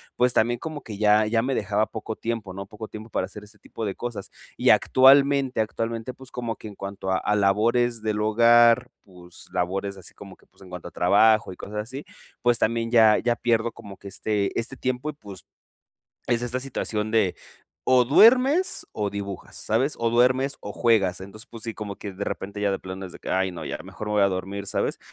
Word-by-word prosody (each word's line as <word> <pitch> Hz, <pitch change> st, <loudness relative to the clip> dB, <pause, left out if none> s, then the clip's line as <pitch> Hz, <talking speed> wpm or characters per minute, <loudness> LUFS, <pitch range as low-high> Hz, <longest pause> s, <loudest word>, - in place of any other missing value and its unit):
pues, 125 Hz, 0 st, +3 dB
también 120 Hz, +1 st, +2 dB
como 155 Hz, -2 st, -6 dB
que 105 Hz, -3 st, -8 dB
ya 105 Hz, +1 st, +4 dB
ya 115 Hz, +1 st, +1 dB
me 130 Hz, +2 st, -1 dB
dejaba 105 Hz, 0 st, 0 dB
poco 110 Hz, 0 st, -6 dB
tiempo, 115 Hz, -5 st, -4 dB
¿no? 100 Hz, 0 st, -7 dB
Poco 105 Hz, +1 st, -9 dB
tiempo 110 Hz, +1 st, -10 dB
para -, -, -1 dB
hacer 105 Hz, -, -11 dB
ese 105 Hz, 0 st, -15 dB
tipo 115 Hz, -, -7 dB
de 100 Hz, -, -3 dB
cosas. 120 Hz, -3 st, -6 dB, 0.3 s
Y -, -, +2 dB
actualmente 135 Hz, -1 st, +5 dB
actualmente, 115 Hz, +2 st, -3 dB
pues, 130 Hz, 0 st, -15 dB
como 120 Hz, -2 st, -4 dB
que -, -, -10 dB
en 100 Hz, -, -12 dB
cuanto 100 Hz, -1 st, -5 dB
a 95 Hz, -, +2 dB
a 105 Hz, -, 0 dB
labores 115 Hz, +4 st, +2 dB
del 105 Hz, -1 st, -1 dB
hogar, 120 Hz, +2 st, +5 dB
pues, 90 Hz, -2 st, -15 dB
labores 95 Hz, +2 st, -2 dB
así 95 Hz, -, -10 dB
como 100 Hz, -2 st, -12 dB
que, -, -, -26 dB
pues, -, -, -27 dB
en 95 Hz, -, -13 dB
cuanto 90 Hz, -1 st, -8 dB
a -, -, -10 dB
trabajo 105 Hz, +4 st, +3 dB
y 90 Hz, -, -10 dB
cosas 105 Hz, +1 st, -6 dB
así, 130 Hz, +7 st, -6 dB, 0.4 s
pues 120 Hz, -1 st, +3 dB
también 115 Hz, 0 st, 0 dB
ya 110 Hz, -3 st, +6 dB
ya 120 Hz, -1 st, +1 dB
pierdo 115 Hz, -1 st, 0 dB
como 100 Hz, -4 st, -11 dB
que -, -, -22 dB
este 100 Hz, 0 st, -2 dB
este 125 Hz, +4 st, -5 dB
tiempo 130 Hz, +4 st, -2 dB
y, -, -, -4 dB
pues, 100 Hz, -, -12 dB, 0.8 s
es 120 Hz, 0 st, +1 dB
esta 120 Hz, +1 st, -2 dB
situación 110 Hz, -5 st, -3 dB
de 110 Hz, -5 st, +2 dB, 0.5 s
¿o 130 Hz, -1 st, +4 dB
duermes 260 Hz, -, +4 dB
o 105 Hz, -1 st, -2 dB
dibujas?, 100 Hz, -2 st, -7 dB
¿sabes? 130 Hz, +7 st, 0 dB
¿O 115 Hz, 0 st, 0 dB
duermes 130 Hz, +3 st, +2 dB
o 105 Hz, -, -7 dB
juegas? 100 Hz, -7 st, +2 dB
Entonces, 100 Hz, +3 st, -11 dB
sí, 115 Hz, -, -4 dB
como 100 Hz, -2 st, -6 dB
que 100 Hz, -, -7 dB
de 100 Hz, +2 st, -5 dB
repente 100 Hz, +1 st, -5 dB
ya 100 Hz, -1 st, +1 dB
de 95 Hz, -, -1 dB
plano 95 Hz, +1 st, -7 dB
es 90 Hz, -, -12 dB
de -, -, -11 dB
que: -, -, -7 dB
"Ay 95 Hz, 0 st, +1 dB
no, 85 Hz, -3 st, -7 dB
ya -, -, -4 dB
mejor 105 Hz, -, -8 dB
me -, -, -2 dB
voy 105 Hz, -, +4 dB
a 100 Hz, -, +5 dB
dormir", 95 Hz, +2 st, -4 dB
¿sabes? -, -, -2 dB
110 Hz, 215 wpm, -24 LUFS, 100-120 Hz, 0.8 s, ya